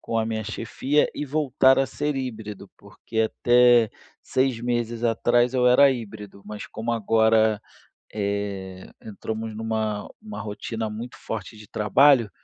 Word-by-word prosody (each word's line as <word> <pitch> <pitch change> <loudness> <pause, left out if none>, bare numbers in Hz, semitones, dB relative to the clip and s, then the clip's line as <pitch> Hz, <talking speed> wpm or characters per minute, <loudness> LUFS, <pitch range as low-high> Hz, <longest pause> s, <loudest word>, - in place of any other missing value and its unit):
com 115 - -4
a 110 - +1
minha 110 -1 -3
chefia 130 +7 0
e 150 - -4
voltar 135 -2 +3
a 135 - +3
ser 145 +1 -3
híbrido, 110 -6 -6
porque 105 +2 -5
até 120 0 +4 0.3
6 130 -2 0
meses 120 -1 -2
atrás 120 +1 +2
eu 125 -1 +2
era 135 +3 +6
híbrido, 105 -5 -7
mas 105 0 -7
como 115 +2 -5
agora, 110 -1 +3 0.5
eh, 100 -2 -4 0.2
entramos 110 +1 -6
numa 110 -2 -2
numa 215 0 -9
rotina 110 +1 -5
muito 115 +3 -7
forte 110 0 -6
de 105 0 -13
trabalho, 115 +3 +4
115 Hz, 140 wpm, -24 LUFS, 105-125 Hz, 0.5 s, era